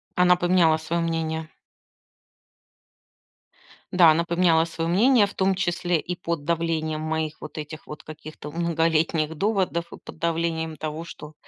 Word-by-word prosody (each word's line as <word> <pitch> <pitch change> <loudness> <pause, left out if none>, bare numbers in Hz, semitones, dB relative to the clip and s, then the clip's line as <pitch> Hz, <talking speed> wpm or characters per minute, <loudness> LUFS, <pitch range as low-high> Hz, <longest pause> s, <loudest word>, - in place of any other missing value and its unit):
Она 180 0 +5
поменяла 175 -3 +3
своё 165 +2 -2
мнение. 160 -1 -2 2.4
Да, 175 -3 +6
она 165 +2 +2
поменяла 170 -1 +3
своё 165 0 -3
мнение, 220 +3 +4
в 200 - -11
том 190 0 +2
числе 175 -2 0
и 180 +3 -4
под 170 -4 -4
давлением 160 -2 -1
моих 155 -1 -3
вот 155 0 -9
этих 155 +1 -7
вот 150 - -9
каких-то 155 -1 -9
многолетних 160 -1 0
доводов 190 -2 0
и - - -8
под - - -12
давлением 165 -1 -1
того, 155 +2 -5
что 155 -2 -10
165 Hz, 140 wpm, -24 LUFS, 155-175 Hz, 2.4 s, Да